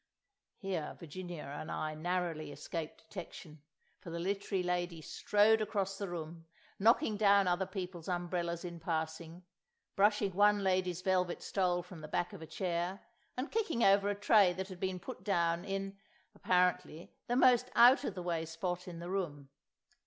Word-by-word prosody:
Here 185 -6 -4
Virginia 175 0 -7
and 145 +2 -7
I 155 0 -2
narrowly 165 -2 -2
escaped 155 +2 -6
detection, 160 -5 -9 0.4
for 180 - -10
the 170 - -4
Literary 195 +1 -1
Lady 175 -1 -1
strode 210 +7 +3
across 195 -2 -2
the 200 -2 -3
room, 165 -1 -7 0.3
knocking 225 +1 +3
down 200 -2 +5
other 180 +1 +1
people's 180 -4 -6
umbrellas 175 -1 -2
in 170 -1 -6
passing, 160 +1 -4 0.5
brushing 205 -1 +3
one 205 +1 +4
lady's 185 -2 0
velvet 180 -2 +1
stole 180 -2 0
from 180 -2 -11
the 155 - -7
back 175 +6 -2
of 195 - -9
a 160 - -8
chair, 180 +2 -2 0.4
and 255 +5 -3
kicking 410 - 0
over 200 +1 +5
a 205 - 0
tray 205 -2 +5
that 190 +2 -5
had 185 -2 -9
been 185 -1 -2
put 180 - -8
down 170 -4 +1
in, 195 0 -4 0.3
apparently, 180 -2 0
the 245 - 0
most 250 -1 +5
out 250 +4 +7
of 210 - -3
the 180 - -5
way 170 -2 -1
spot 175 +3 -4
in 175 -2 -7
the 170 +1 -7
room. 145 -8 -3
180 Hz, 165 wpm, -33 LUFS, 170-195 Hz, 0.5 s, out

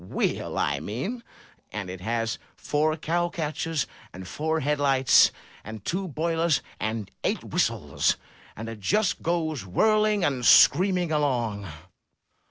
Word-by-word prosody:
"Wheel, 90 - -2
I 70 0 0
mean. 130 - -4 0.5
And 105 -3 -5
it 90 0 -7
has 115 +2 -2 0.2
four 155 +1 0
cow 175 +2 0
catchers, 160 -2 -2 0.3
and 95 0 -9
four 160 - -1
head 150 +1 0
lights, 135 -2 +5 0.3
and 110 -2 -9
two 190 +2 -2
boilers, 165 0 0 0.2
and 110 -1 -3
eight - - -1
whistles, - - 0 0.4
and 110 +2 -7
it 115 -1 -7
just 205 - +1
goes 160 - -1
whirling 215 - +2
and 130 -3 0
screaming 180 +5 +5
along. 120 -9 0
150 Hz, 130 wpm, -26 LUFS, 110-170 Hz, 0.5 s, lights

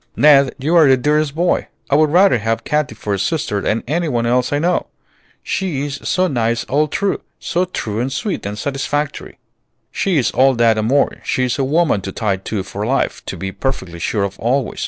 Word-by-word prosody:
"Ned, 140 -3 +5
you 150 +6 0
are 160 -4 +7
the 130 - +5
dearest 150 +2 +1
boy! 175 +2 +1 0.2
I - - -3
would 155 +1 +4
rather 180 -4 +4
have 110 +2 -1
Katy 150 -6 -1
for 105 -1 -3
a 100 - -1
sister 105 - -1
than 110 - -1
any 165 +5 0
one 120 -3 0
else 125 +1 +1
I 145 - +1
know. 175 +4 0 0.6
She's 145 -7 -3
so 185 - +2
nice 120 -7 0
all 150 +4 +1
through, 200 +6 -1 0.2
so 180 +2 0
true 110 - -4
and 125 +3 -1
sweet 180 +9 -3
and 105 +1 -5
satisfactory." 140 +3 -3 0.5
"She 190 -5 0
is 130 - +1
all 135 0 +3
that 115 -2 +3
and 110 - 0
more; 140 +3 +2
she's 130 +1 -1
a - - +2
woman 150 - +2
to 95 - -5
tie 100 -1 -1
to 95 +1 -4
for 100 +2 -6
life, 130 +5 -1
to - - -5
be 95 0 -4
perfectly 95 -9 -4
sure 100 +4 -1
of 100 0 -4
always. 125 +2 -1
135 Hz, 205 wpm, -18 LUFS, 110-150 Hz, 0.6 s, are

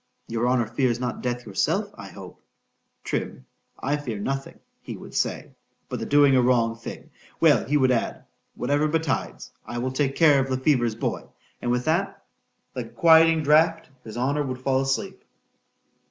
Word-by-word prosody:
—Your 115 +1 -1
honour 125 -2 +2
fears 120 +1 0
not 125 -1 -3
death 125 -1 -3
yourself.—I - - -2
hope, - - -12 0.6
Trim, - - -4 0.3
I 145 +2 -1
fear 125 -7 -5
nothing, 135 +6 -4 0.2
he - - -7
would - - -12
say, - - -2 0.4
but - - -4
the - - -4
doing 145 -2 +5
a 130 - +5
wrong 120 -2 +2
thing.——Well, 115 - -1
he 150 +2 +1
would 130 -2 +3
add, 120 - -2 0.3
whatever 145 +4 +1
betides, 155 -3 -2
I 120 - -7
will 130 +2 -2
take 135 0 -1
care 150 -4 +5
of 135 - -7
Le 130 - 0
Fever's 125 -5 +1
boy.—And 120 - -6
with 125 0 0
that, 170 +5 -1 0.5
like - - -3
a - - -16
quieting 165 -2 +5
draught, 160 +1 +3
his 110 +1 -9
honour 140 +4 0
would 130 -3 -4
fall 130 0 +1
asleep. 135 0 -2
130 Hz, 165 wpm, -24 LUFS, 120-150 Hz, 0.6 s, doing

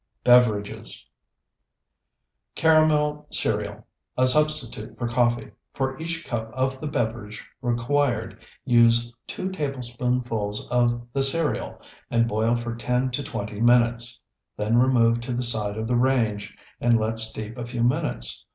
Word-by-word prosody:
BEVERAGES 115 -5 +2 1.4
CARAMEL 150 -2 +3
CEREAL - - -1 0.3
(A 130 - +4
Substitute 150 -5 +1
for 120 - -2
Coffee) 120 0 0 0.2
For 130 -1 -1
each 165 0 -4
cup 110 -2 -4
of 130 0 -1
the 155 - -3
beverage 115 -6 -3
required 120 +2 0 0.3
use 120 0 +4
two 190 - -4
tablespoonfuls 125 - -2
of 120 -1 +1
the 135 - +1
cereal 150 +4 +1 0.3
and 115 0 +2
boil 110 +2 +1
for 120 0 -4
ten 125 +2 -1
to 125 - -2
twenty 105 -5 -5
minutes. 120 0 +2 0.3
Then 110 +3 +2
remove 120 -2 +3
to 120 +1 -4
the 125 +1 -1
side 110 -3 0
of 110 0 -3
the 125 - +1
range 115 -5 0 0.2
and 120 -1 +3
let 110 +1 -1
steep 110 0 -3
a 120 -2 -5
few 120 -1 -2
minutes. 125 - -1
120 Hz, 135 wpm, -24 LUFS, 115-130 Hz, 1.4 s, A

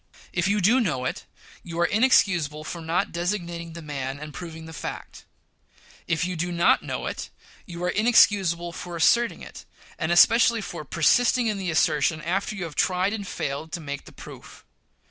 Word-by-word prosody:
If 175 +1 0
you 205 +1 +1
do 225 +8 +4
know 150 - -1
it, - - -4 0.4
you 170 -1 -7
are 175 - +4
inexcusable 175 - +2
for 170 +2 -6
not 165 +2 -1
designating 170 -2 -3
the 170 0 -9
man 140 -2 -5
and 150 0 -8
proving 160 0 -8
the 160 - -10
fact. - - -8 0.8
If 170 0 0
you 180 0 -3
do 175 +2 -2
not 170 0 +3
know - - -5
it, - - -5 0.4
you 175 -1 -7
are 180 - +1
inexcusable 195 -6 +3
for 175 +1 -7
asserting 235 +8 +2
it, - - -11 0.4
and 160 - -1
especially 230 +5 +5
for 170 -5 -6
persisting 240 - +2
in 210 -3 -1
the 185 -2 -3
assertion 155 -1 +2
after 190 +6 -2
you 195 - -5
have 165 -3 -6
tried 185 +5 +1
and 205 -3 -5
failed 140 +1 -4
to 175 - -3
make 140 -3 -6
the - - -13
proof. - - -13
175 Hz, 185 wpm, -25 LUFS, 160-200 Hz, 0.8 s, especially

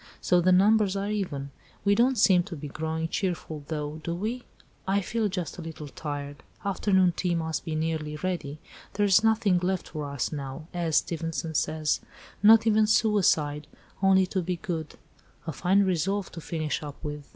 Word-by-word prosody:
So 180 -1 +3
the 185 +2 +3
numbers 200 +1 +4
are 200 +1 -2
even. 145 -10 -3 0.3
We 200 - +5
don't 245 +4 +3
seem 190 -4 +5
to 190 - -7
be 150 -1 -7
growing 160 +3 -3
cheerful, 165 -4 -3
though, 150 -1 -4
do 170 +2 -2
we? 225 +7 -3 0.4
I 195 +1 +2
feel 215 +2 -1
just 180 -4 -4
a - - -4
little 160 -2 -7
tired; 145 +1 -6 0.2
afternoon 190 -2 +2
tea 180 -2 0
must 160 -1 -2
be 160 - -3
nearly 155 -1 -2
ready. 155 -4 -3 0.4
There's 205 0 +4
nothing 220 -5 +3
left 185 +1 -2
for 150 -3 -5
us 140 -2 -2
now 145 +1 -6
(as 170 -3 -1
Stevenson 165 -1 -2
says), 155 0 0 0.4
'not 220 +2 +7
even 215 -1 +4
suicide, 165 -9 +2 0.3
only 190 -1 +5
to 185 +1 -2
be 180 +1 -2
good,' 165 -5 -5 0.5
a 160 - -3
fine 190 +7 +3
resolve 190 +2 0
to 165 - -8
finish 155 -1 -3
up 145 -2 -7
with." 150 -2 -6
175 Hz, 175 wpm, -27 LUFS, 155-200 Hz, 0.5 s, not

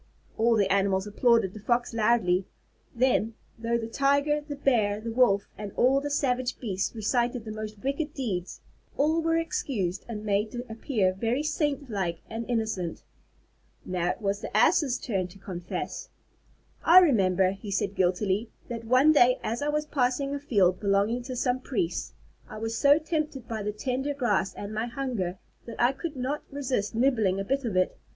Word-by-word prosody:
All 230 +1 +3
the 195 -3 +2
animals 195 -1 +1
applauded 215 -2 +2
the 215 - -9
Fox 240 +3 0
loudly. 215 -5 +2 0.5
Then, 230 -3 +2 0.2
though 230 +1 0
the 230 - -4
Tiger, 280 +5 +2
the 295 -1 -7
Bear, 220 -7 +1
the 230 +1 -5
Wolf, 225 -5 +3
and 205 -1 -5
all 270 +3 +3
the 290 - -3
savage 255 -3 0
beasts 200 -2 -2
recited 240 +2 0
the 215 - -5
most 215 0 -6
wicked 280 +3 -2
deeds, 195 -10 -4 0.4
all 315 +3 +2
were 330 0 +1
excused 210 - -2
and 215 -2 -5
made 210 +1 0
to 245 0 -5
appear 220 -4 0
very 230 +8 -1
saint 295 -2 -1
like 175 -5 -2
and 225 +1 -5
innocent. 220 -8 -2 0.8
It 180 +2 -1
was 200 -1 -1
now - - -5
the - - -1
Ass's 275 - +4
turn 195 -7 -2
to 180 +2 -15
confess. 180 -2 -5 0.7
"I 345 - +7
remember," 195 - +5
he 195 +2 -8
said 200 0 -1
guiltily, 190 +4 0 0.2
"that 230 -1 -5
one 255 +6 +5
day 250 -4 +5
as 230 +5 -2
I 290 - 0
was 300 0 0
passing 275 -1 0
a 285 - -2
field 200 -10 +2
belonging 205 +4 +1
to 255 -1 -5
some 250 +1 0
priests, 195 -10 -2 0.4
I - - -8
was 225 +1 -3
so 285 +1 +5
tempted 310 -5 -3
by 220 -2 -4
the 210 +1 -2
tender 265 +6 -2
grass 215 -8 0
and 205 +1 -6
my 220 +2 -2
hunger, 235 -8 -3 0.3
that 230 - -8
I 240 +2 +4
could 310 +3 -6
not 265 +3 -2
resist 260 -7 -2
nibbling 225 -6 +2
a - - -1
bit 275 +5 -1
of 205 -5 -1
it. 185 - +2
230 Hz, 180 wpm, -27 LUFS, 200-270 Hz, 0.8 s, I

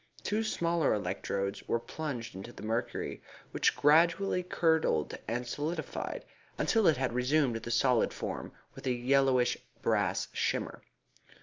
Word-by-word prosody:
Two 215 +2 0
smaller 170 - +1
electrodes 100 -1 -2
were 115 - +1
plunged 125 -2 -5
into 95 +5 -8
the - - -11
mercury, 115 +2 -2 0.3
which - - +2
gradually 170 +5 +4
curdled 160 - +1
and 120 +3 -2
solidified, 155 +6 -4 0.3
until 225 -4 +3
it 155 - +5
had 130 -2 -1
resumed 125 0 +2
the 115 - -7
solid 120 0 +3
form, - - -5 0.2
with - - -8
a 130 - +3
yellowish 125 0 +3 0.3
brassy - - +1
shimmer. - - -1
130 Hz, 130 wpm, -31 LUFS, 120-160 Hz, 0.3 s, it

